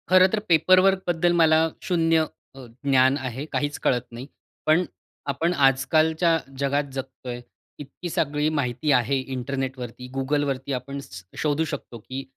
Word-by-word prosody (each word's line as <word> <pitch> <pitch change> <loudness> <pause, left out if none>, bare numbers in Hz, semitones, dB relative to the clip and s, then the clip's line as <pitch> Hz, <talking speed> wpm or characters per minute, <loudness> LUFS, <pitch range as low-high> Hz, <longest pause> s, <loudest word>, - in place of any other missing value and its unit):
खरं 185 0 +7
तर 215 - +2
पेपरवर्कबद्दल 185 0 +4
मला 160 0 +5
शून्य 165 -3 +2 0.3
अ, 135 -2 -10 0.2
ज्ञान 135 0 +4
आहे, 130 +1 -5
काहीच 145 0 -1
कळत 125 -1 +1
नाही. 120 +3 -8 0.4
पण 160 +4 +4 0.5
आपण 165 +6 0
आज-कालच्या 155 +4 +3 0.2
जगात 140 +1 +1
जगतोय, 130 -2 -6 0.4
इतकी 145 +5 -8
सगळी 150 -1 0
माहिती 130 +2 0
आहे 130 +1 +3 0.2
इंटरनेटवरती, 130 -1 -5
Googleवरती, 140 0 -1
आपण 135 +2 -4
स 95 -8 -10
शोधू 150 +1 +1
शकतो 145 -5 -6
की 130 +5 -7
140 Hz, 130 wpm, -24 LUFS, 130-160 Hz, 0.5 s, खरं